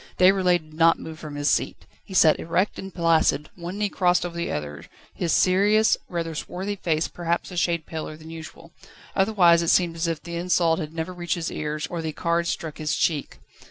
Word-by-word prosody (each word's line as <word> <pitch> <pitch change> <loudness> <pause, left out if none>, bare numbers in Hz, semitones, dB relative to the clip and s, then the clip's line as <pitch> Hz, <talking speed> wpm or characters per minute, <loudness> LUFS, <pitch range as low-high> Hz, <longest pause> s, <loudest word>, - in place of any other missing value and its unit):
Déroulède 185 -2 +4
did - - -17
not 165 +1 +4
move 160 0 -9
from 150 -2 -8
his 145 0 -1
seat. - - 0 0.2
He 190 - -10
sat 160 -4 +5
erect 175 +5 -1
and 195 - -7
placid, 165 -4 +2
one 175 +2 -6
knee 210 0 +1
crossed 180 -2 +2
over 175 -1 -6
the 170 - -2
other, 75 -1 -5 0.3
his 170 -2 -2
serious, 205 +6 +4
rather 165 -2 -3
swarthy 190 +6 -4
face 160 -4 0
perhaps 170 +1 -3
a - - -7
shade 170 -2 0
paler 155 -1 -6
than 160 +1 -12
usual: 165 +1 -10 0.4
otherwise 190 -4 +4
it 170 - -2
seemed 175 -2 +3
as 165 +1 -1
if 165 -2 -2
the 170 0 -5
insult 170 -1 +2
had 155 -3 -5
never 165 +2 -4
reached 175 -2 -2
his 170 -2 -3
ears, 150 0 -3
or 170 -1 -4
the 160 -1 -4
cards 170 +1 0
struck 160 -2 -4
his 155 -1 -1
cheek. 150 -4 -1
170 Hz, 205 wpm, -24 LUFS, 160-180 Hz, 0.4 s, sat